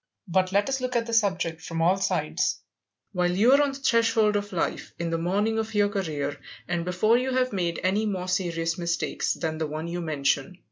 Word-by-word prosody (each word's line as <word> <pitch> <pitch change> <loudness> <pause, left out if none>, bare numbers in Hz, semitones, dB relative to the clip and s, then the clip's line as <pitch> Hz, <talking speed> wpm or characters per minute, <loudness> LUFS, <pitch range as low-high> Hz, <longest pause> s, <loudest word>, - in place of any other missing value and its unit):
But 185 +1 +1
let 200 +1 +2
us 270 -1 -1
look 250 0 -2
at 235 -1 +1
the 230 - -5
subject 185 -7 +1
from 165 -1 -5
all 175 +3 +4
sides, 195 - 0 0.5
while 180 -2 +1
you 205 +8 +4
are 280 +2 +6
on 285 -1 +1
the - - -6
threshold 230 -5 +3
of 205 0 -2
life, 175 - -2
in 170 -1 -3
the 165 - 0
morning 205 +6 0
of 220 0 -4
your 205 -1 +3
career, 150 -8 -3 0.3
and 175 -1 -1
before 200 +7 +2
you 260 +1 -1
have 255 -2 +1
made 175 -3 -1
any 200 +4 +1
more 185 -3 -3
serious 170 -2 -1
mistakes 170 0 -1
than 160 -1 -3
the 160 - -1
one 155 +2 -5
you 175 +1 -3
mention. 145 +1 -1
185 Hz, 215 wpm, -26 LUFS, 170-220 Hz, 0.5 s, are